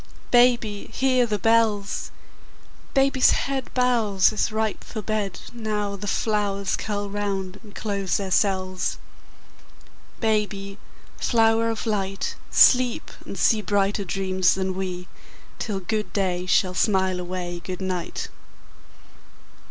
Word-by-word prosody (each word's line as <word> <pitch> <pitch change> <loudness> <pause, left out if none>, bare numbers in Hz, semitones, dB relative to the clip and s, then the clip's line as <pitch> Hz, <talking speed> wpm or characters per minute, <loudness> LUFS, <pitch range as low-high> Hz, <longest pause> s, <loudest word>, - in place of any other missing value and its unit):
Baby, 240 -4 +3
hear 255 -2 +2
the 210 -2 0
bells! 215 -1 +1 0.9
Baby's 270 -1 +4 0.2
head 270 -2 -3
Bows, 225 -6 +3
as 215 - 0
ripe 220 -1 -2
for 215 -2 -6
bed, 205 -2 -2
Now 210 -3 -2
the 205 +1 -7
flowers 200 -2 0
curl 205 -1 -3
round 200 -1 -3
and 210 -2 -15
close 200 -3 -1
their 195 -2 -4
cells. 185 -2 0 1.2
Baby, 205 -3 -1 0.4
flower 225 -1 +3
of 225 +1 -3
light, 195 -3 -2
Sleep, 250 -2 +4 0.2
and - - -6
see 220 -2 +3
Brighter 205 0 +1
dreams 190 0 +1
than 190 0 -1
we, 180 -1 -4 0.5
Till 205 -4 -2
good 215 +3 -2
day 185 -2 -1
shall 185 0 +3
smile 190 -2 +1
away 175 -1 -4
good 185 -1 -5
night. 185 -3 -3
205 Hz, 120 wpm, -24 LUFS, 190-220 Hz, 1.2 s, Baby's